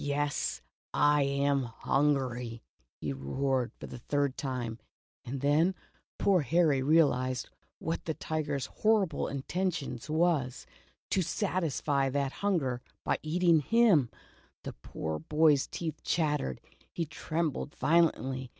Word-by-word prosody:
"Yes, 145 +1 -1 0.3
I 145 0 +4
am 140 0 +2
HUNGRY," 125 -2 0 0.4
he 70 -2 -3
roared, 125 - -1
for - - -7
the - - -8
third 140 +1 0
time, 120 -4 -4 0.4
and 130 +2 -5
then 155 +6 +3 0.4
poor 190 -4 +3
Harry 150 -1 +3
realized 130 -4 +2 0.3
what 165 - -3
the 160 - -2
tiger's 145 -4 -2
horrible 210 -7 +1
intention 150 -2 -2
was 155 -6 +1 0.2
— - - -38
to 190 - +3
satisfy 160 -6 0
that 140 0 -1
hun 200 +2 0
ger, 125 -4 -3 0.2
by - - 0
eating 165 0 +3
//////. 195 - +4 0.5
The - - -6
poor 80 +5 -5
boy's 150 - +3
teeth 160 -3 -5
chat 150 -3 +1
tered, 65 - -4 0.3
he 170 - -2
trembled 155 -1 -3
violently. 135 -4 +2
145 Hz, 125 wpm, -30 LUFS, 130-165 Hz, 0.5 s, I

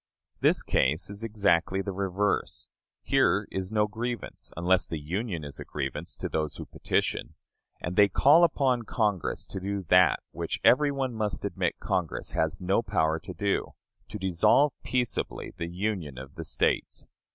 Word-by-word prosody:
This - - +3
case 75 +9 +1
is 100 +2 -4
exactly 100 -4 +1
the 100 - -3
reverse. 100 +1 -1 0.4
Here - - +2
is 95 +1 -3
no 105 -1 +3
grievance, 120 +3 -5
unless 90 +2 +2
the 80 - -3
Union 85 +3 -3
is 70 -1 -8
a - - -5
grievance 70 -2 -4
to - - -4
those 75 -2 -2
who - - -7
petition. - - -2 0.5
And 90 +1 -4
they 105 +1 +7
call 145 - +5
upon 135 -7 +2
Congress 105 -5 -1
to 95 - -6
do 100 +1 -3
that 90 0 +5
which - - -3
every 145 +3 +5
one 135 -3 -2
must 110 -2 -2
admit - - -1
Congress 90 -4 -2
has 80 +3 0
no 95 +4 +1
power 80 -7 +1
to - - -8
do 100 -2 -1 0.3
to 105 - -6
dissolve 95 - +3
peaceably 125 -2 -2
the 85 -1 -4
union 90 -6 -3
of 65 +1 -9
the - - -7
States. - - -1
100 Hz, 165 wpm, -28 LUFS, 85-110 Hz, 0.5 s, they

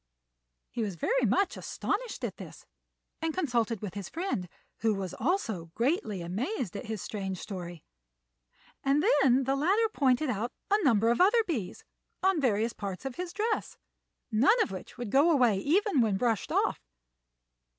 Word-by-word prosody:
He 235 - -3
was 205 -4 -2
very - - +1
much 395 - +2
astonished 460 +4 -3
at - - -3
this, - - -11 0.6
and 320 -1 -1
consulted 235 - 0
with 200 - -4
his 200 -2 -6
friend, 325 - -3 0.3
who 220 -2 +2
was 190 -3 -4
also 225 - -1
greatly 235 - 0
amazed 215 - -3
at 215 - -6
his 220 -3 -4
strange 195 -3 -4
story; 175 -4 -7 1.0
and 280 +3 +2 0.2
then 265 0 +4
the 270 +1 +1
latter 390 +10 +2
pointed 265 0 +2
out 235 +3 -2 0.2
a 415 0 +3
number 230 -5 +4
of 240 - +2
other 450 +5 +5
bees 260 - -4 0.4
on 380 -4 +3
various 230 -2 +1
parts 200 +3 -6
of 265 -2 -5
his 360 -1 -4
dress, 435 +3 -2 0.5
none 270 - +4
of - - -6
which 185 - -8
would 240 -4 -5
go 285 +5 +5
away 245 - +4
even 340 - +2
when 210 -4 +2
brushed 225 -2 0
off. - - +1
245 Hz, 160 wpm, -29 LUFS, 205-340 Hz, 1.0 s, other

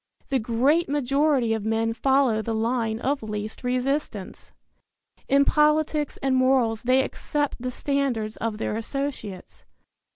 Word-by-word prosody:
The 270 -2 +1
great 260 +8 +2
majority 275 -3 +2
of 220 -2 -2
men 225 +1 0
follow 265 -2 +2
the 225 +1 -3
line 225 0 0
of 275 +3 -1
least 215 +1 -5
resistance. 250 -5 -2 0.8
In 280 +1 +4
politics 300 0 +2
and 270 -1 +2
morals 255 -4 +2
they 255 +2 +3
accept 290 +1 -2
the 255 +1 -3
standards 250 -5 -1
of 225 -2 -3
their 215 - -2
associates. 230 -4 -5
255 Hz, 130 wpm, -25 LUFS, 225-280 Hz, 0.8 s, In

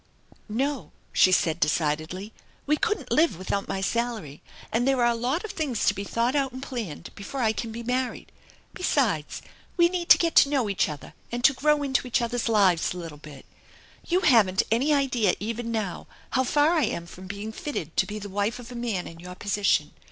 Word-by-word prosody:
" - - -20 0.2
No," 270 +5 -2 0.2
she 185 - +5
said 170 -2 +2
decidedly. 155 +6 -1 0.2
" - - -33
We 300 - +3
couldn't 420 +7 -2
live 315 - +3
without 190 +2 -2
my 190 - -3
salary, 220 - -2 0.3
and 240 +3 +1
there 270 -1 +3
are 240 - +4
a - - +1
lot 255 - -1
of 425 - -5
things 275 -9 -2
to - - +4
be 200 0 -5
thought 235 +6 0
out 275 -2 +1
and 260 +1 -7
planned 220 - -6
before 245 +6 -5
I 220 -1 +3
can 225 +1 -4
be 235 +1 -6
married. 250 +1 -2 0.4
Besides, 235 - 0 0.3
we 340 -1 +5
need 350 -1 -3
to - - +10
get 335 -1 0
to 280 - +7
know 260 -8 +1
each 195 - +1
other 150 -2 -8 0.2
and 240 0 -3
to 270 - +6
grow 295 +2 +2
into 265 -2 0
each 245 - +1
other's 240 0 -1
lives 190 -6 +3
a - - -6
little 165 -4 -8
bit. 150 -2 -12 0.6
You 360 +2 +2
haven't 210 - +4
any 255 +7 +2
idea 255 -9 +2
even 230 +2 -4
now 215 -6 -3 0.2
how 260 0 +2
far 295 +4 +3
I 320 -6 +3
am 170 -5 -3
from 185 +2 -11
being 205 +3 -5
fitted 220 - -5
to 190 - +3
be 210 - -5
the 205 -1 -6
wife 205 +3 -1
of 245 0 -10
a - - -8
man 230 -6 -2
in 165 - -10
your 180 +1 -9
position. 205 +1 +1
230 Hz, 215 wpm, -26 LUFS, 190-265 Hz, 0.6 s, to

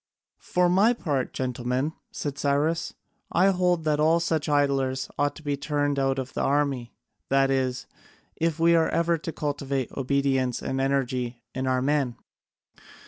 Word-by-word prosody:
"For 180 0 +1
my 195 +7 +4
part, 145 - -2
gentlemen," 125 +3 -2 0.2
said 145 -1 -4
Cyrus, 145 +4 0 0.4
"I 185 +3 +4
hold 180 -2 +1
that 150 -1 +1
all 160 +2 +4
such 160 -3 -1
idlers 135 -2 +1
ought 145 0 +1
to - - -12
be 145 -1 -1
turned 145 0 -1
out 135 0 +1
of 130 0 -4
the - - -2
army, 140 -4 0 0.3
that 135 0 +3
is, 130 -1 0 0.5
if 165 -1 -1
we 170 +1 +5
are 165 -1 +3
ever 170 0 +1
to 165 - -5
cultivate 140 -4 -2
obedience 135 -2 0
and 135 0 -2
energy 125 -3 -1
in 130 0 -2
our 130 0 +1
men. 140 -4 +1
140 Hz, 155 wpm, -26 LUFS, 130-155 Hz, 0.5 s, we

